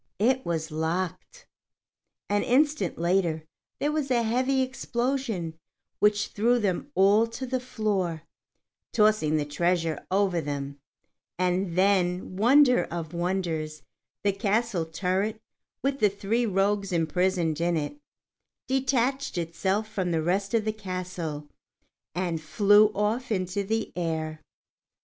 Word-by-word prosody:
It 255 +5 +2
was 160 -1 -2
locked! 175 - -3 0.8
An 205 0 +1
instant 290 +4 +2
later 170 -2 +1 0.3
there 290 - 0
was 300 -3 -1
a 240 -2 +2
heavy 255 +4 +1
explosion 240 -9 -2 0.4
which 210 0 +3
threw 235 +4 +2
them 205 +4 -1
all 205 +4 +5
to 230 +3 -6
the 255 0 -1
floor, 200 -9 -2 0.7
tossing 210 -9 +3
the 150 - 0
treasure 165 +1 0
over 190 -3 +2
them; 140 -1 -5 0.6
and 180 -1 0
then, 185 -2 +2
wonder 250 +5 +5
of 165 -1 -6
wonders, 170 -4 -2 0.4
the 205 - +3
castle 200 -3 0
turret, 195 +6 -1 0.4
with 275 0 0
the 210 - +5
three 210 +4 -1
rogues 200 0 +1
imprisoned 170 -1 +1
in 170 0 +1
it, 155 - -4 0.7
detached 265 -2 0
itself 190 +5 -1
from 190 -4 -2
the 165 -2 0
rest 195 +5 0
of 220 -2 +1
the 215 - 0
castle, 185 -7 -5 0.7
and 175 -3 -1
flew 205 +6 +5
off 225 +5 -1
into 185 0 -1
the 220 +3 -2
air. 160 -2 -3
195 Hz, 125 wpm, -27 LUFS, 170-230 Hz, 0.8 s, all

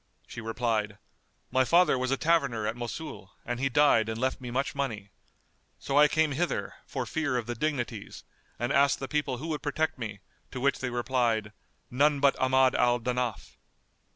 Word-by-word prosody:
She 115 - -8
replied, 110 -2 -1 0.5
"My 130 - +4
father 170 +3 +4
was 130 0 -1
a 135 - +1
taverner 140 -10 +1
at 110 +2 -1
Mosul 120 -2 -7
and 120 0 -3
he 135 +1 +1
died 120 -5 +4
and 110 0 -4
left 130 +1 -1
me 125 - -6
much 135 +3 -1
money. 110 -8 -4 0.7
So 135 - -4
I 150 - +8
came 155 0 +1
hither, 170 +5 -2
for 130 -3 -3
fear 145 +1 -1
of 120 - -2
the 120 - -3
Dignities, 120 -5 -3 0.3
and 120 +3 -1
asked 140 0 +4
the 135 - -5
people 145 -3 -1
who 155 +6 -6
would 155 -2 -2
protect 150 0 -1
me, 105 -4 -6 0.3
to 130 - -6
which 140 +1 +1
they 130 - -2
replied, 120 -4 0 0.4
'None 145 +3 +3
but 140 0 +4
Ahmad 130 0 +4
al 120 0 +3
Danaf. 125 -1 -3
130 Hz, 180 wpm, -28 LUFS, 120-140 Hz, 0.7 s, I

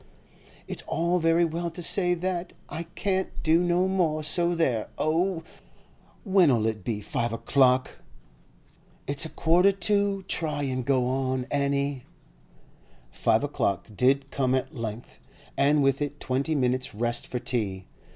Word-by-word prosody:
'It's - - -4
all 170 +2 +1
very 165 +1 +3
well 170 +1 -3
to 170 +1 -7
say 180 0 +2
that. 180 0 -3
I 165 +2 -6
can't 190 -1 -1
do 160 +1 +4
no 175 +1 +2
more, 165 -5 0
so 175 +2 +1
there! 130 -10 0
Oh, 165 +2 0 0.8
when'll 170 - +4
it 110 -3 -2
be 105 -1 -3
five 120 +3 -2
o'clock?' 130 +1 +2 1.1
'It's 140 +3 +1
a - - -5
quarter 175 +6 +3
to. 200 0 0
Try 150 -5 -1
and 130 -2 -2
go 130 -1 +2
on, 130 0 -1
Annie.' 140 -1 -1 1.1
Five - - +1
o'clock 100 +3 -1
did 135 +4 +2
come 130 -1 +1
at 130 - -2
length, 115 -1 -6 0.4
and 145 +1 +3
with 135 +1 +2
it 145 0 -3
twenty 135 +5 -1
minutes' 130 -3 0
rest 120 +2 -1
for 125 - -3
tea. 100 -7 -2
145 Hz, 140 wpm, -26 LUFS, 125-170 Hz, 1.1 s, do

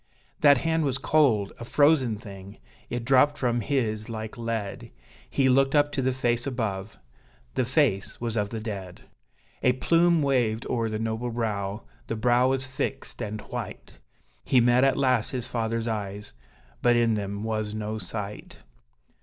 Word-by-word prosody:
That 145 -2 +6
hand 160 +3 0
was 135 -3 0
cold 140 -8 +2
a - - -6
frozen 135 -3 +3
thing 100 -3 -11 0.3
it 120 -1 -3
dropped 135 +3 +4
from 120 -2 0
his 110 -5 -1
like 110 -1 -5
lead: 115 -4 -4 0.4
He 135 - +2
looked 135 +2 +3
up 145 0 +4
to 135 - -1
the 130 0 +1
face 120 -1 0
above 110 -5 -3 0.6
the 130 - +1
face 130 -7 +1
was 115 -2 -3
of 105 -2 0
the 115 - -4
dead! 100 -5 -6 0.6
A 125 - +4
plume 165 +4 +3
waved 120 -5 +1
o'er 115 -2 0
the 110 - -2
noble 110 +2 -2
brow 105 -3 -3 0.2
the 115 - -2
brow 120 +3 +3
was 135 0 0
fixed 130 0 -4
and 105 -1 -4
white; - - -7 0.4
He 130 - +4
met 120 +2 +4
at 135 -1 +3
last 130 -5 +2
his 125 -3 -2
father's 115 -2 -2
eyes 105 -2 -4 0.5
but 120 -1 +4
in 115 -1 +3
them 100 0 -3
was 110 -1 -2
no 110 0 -3
sight! 105 +1 -7
115 Hz, 160 wpm, -26 LUFS, 110-130 Hz, 0.6 s, That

